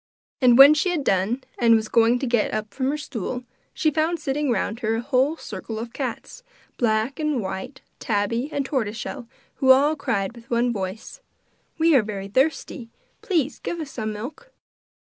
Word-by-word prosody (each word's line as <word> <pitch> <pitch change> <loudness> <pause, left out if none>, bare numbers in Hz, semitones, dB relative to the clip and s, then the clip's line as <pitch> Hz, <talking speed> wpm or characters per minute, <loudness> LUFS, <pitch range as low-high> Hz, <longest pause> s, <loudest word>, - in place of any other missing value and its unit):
And 245 -2 +6
when 275 +2 +10
she 305 +4 +1
had 335 -5 -1
done, 205 +5 0 0.2
and 230 -1 +5
was 220 -1 0
going 230 +2 +4
to 265 - -3
get 235 -3 +1
up 215 -1 -4
from 260 0 -1
her 295 - -1
stool, 250 -3 -5 0.3
she 310 - +1
found 320 +3 0
sitting 290 0 -1
round 225 0 -1
her 225 -1 0
a 225 - -2
whole 270 +4 +1
circle 215 -1 -7
of 230 +1 -6
cats, 265 - -5 0.4
black 225 +3 0
and 305 -4 0
white, 195 +6 -6 0.2
tabby 230 +4 -1
and 280 -2 -2
tortoise 230 -6 -2
shell, 240 0 -6 0.3
who 265 - +1
all 285 +4 +5
cried 200 -8 -2
with 235 -1 -15
one 240 0 +1
voice: 200 - -6 0.6
'We 325 -1 +4
are - - +4
very 200 -2 -5
thirsty, 265 -1 -1 0.3
please 315 -7 -1
give 345 - -4
us 300 -3 -6
some 215 -3 -4
milk! 265 - -8
245 Hz, 185 wpm, -23 LUFS, 220-285 Hz, 0.6 s, when